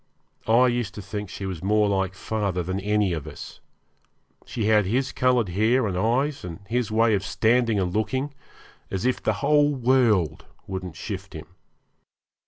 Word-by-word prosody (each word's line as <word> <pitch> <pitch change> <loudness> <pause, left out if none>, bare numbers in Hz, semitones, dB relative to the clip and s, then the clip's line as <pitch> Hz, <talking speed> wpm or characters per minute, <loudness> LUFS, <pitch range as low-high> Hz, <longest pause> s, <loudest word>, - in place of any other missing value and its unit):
I 115 +3 +5
used 120 -5 -1
to 105 - -6
think 105 0 -5
she 100 - -6
was 90 -4 -5
more 105 +1 +3
like 95 -1 0
father 100 -3 -2
than 95 +3 -3
any 105 -1 +1
of 80 -4 -5
us. - - -9 0.9
She 115 - -3
had 105 -2 +4
his 130 +6 0
coloured 125 -5 +2
hair 110 +7 +2
and 95 -4 -2
eyes, 125 +9 0
and 85 -2 -7
his 120 0 -1
way 110 +1 +3
of 95 -2 +1
standing 110 +4 +2
and 90 -2 -1
looking, 130 +6 -1 0.6
as 95 +4 -3
if 130 - +1
the 110 - +1
whole 145 0 +4
world 115 - +2 0.2
wouldn't 95 -3 -6
shift 95 0 -6
him. 80 -1 -8
105 Hz, 170 wpm, -25 LUFS, 95-120 Hz, 0.9 s, I